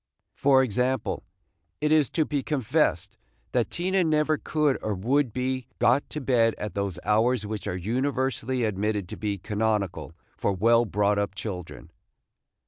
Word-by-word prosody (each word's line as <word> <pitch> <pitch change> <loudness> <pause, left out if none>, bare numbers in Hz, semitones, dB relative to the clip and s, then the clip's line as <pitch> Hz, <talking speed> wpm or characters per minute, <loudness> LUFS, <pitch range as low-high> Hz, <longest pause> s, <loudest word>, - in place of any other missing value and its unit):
For 135 -1 +4
example, 125 +3 -1 0.6
it 150 0 0
is 155 -3 +4
to 155 - +1
be 145 -2 -1
confessed 130 - 0 0.3
that - - +1
Tina 185 +2 0
never 155 -1 +2
could 150 -3 +1
or 105 -2 -2
would 125 +7 +1
be 130 +1 -2
got 145 - +2
to 150 - -4
bed 120 -5 +2
at 105 0 -5
those 100 -4 -2
hours 110 +2 +2
which 105 -2 -5
are 90 - -2
universally 130 +3 -1
admitted 105 -2 -1
to 110 - -6
be 105 -2 -2
canonical 100 -7 -2 0.2
for 100 - 0
well 115 +5 +4
brought 105 0 +1
up 100 -1 -2
children. 95 -5 -7
115 Hz, 150 wpm, -26 LUFS, 100-135 Hz, 0.6 s, For